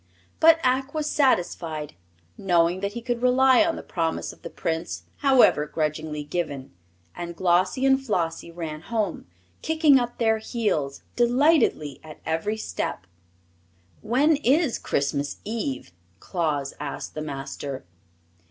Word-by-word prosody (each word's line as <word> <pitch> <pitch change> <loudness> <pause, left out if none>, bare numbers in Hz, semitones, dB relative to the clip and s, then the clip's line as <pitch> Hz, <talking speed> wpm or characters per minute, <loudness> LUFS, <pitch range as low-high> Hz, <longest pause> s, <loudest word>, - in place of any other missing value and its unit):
But 325 0 +7
Ak 265 +3 +1
was 305 -1 -1
satisfied, 170 - 0 0.4
knowing 175 - +2
that 200 +1 -3
he 235 0 -6
could 240 -1 -2
rely 260 +3 +5
on 330 0 0
the - - -7
promise 165 -2 -2
of - - -21
the - - -7
Prince, 165 +1 -3
however 260 - +4
grudgingly 155 -1 -2
given; 145 -4 -4 0.4
and 170 0 -6
Glossie 185 +8 +2
and 270 0 +4
Flossie 170 -9 -2
ran 165 -3 -6
home, 215 - -3 0.3
kicking 315 -4 +4
up 240 -1 -3
their 220 -1 +2
heels 200 - -2
delightedly 245 - +2
at 155 -1 -11
every 165 +7 -1
step. 95 - -4 1.0
"When 275 +8 +3
is 290 0 +2
Christmas 140 0 -1
Eve?" 175 - -4 0.3
Claus 150 - -2
asked 150 - -5
the 155 - -5
Master. 140 -3 -6
185 Hz, 130 wpm, -25 LUFS, 155-255 Hz, 1.0 s, But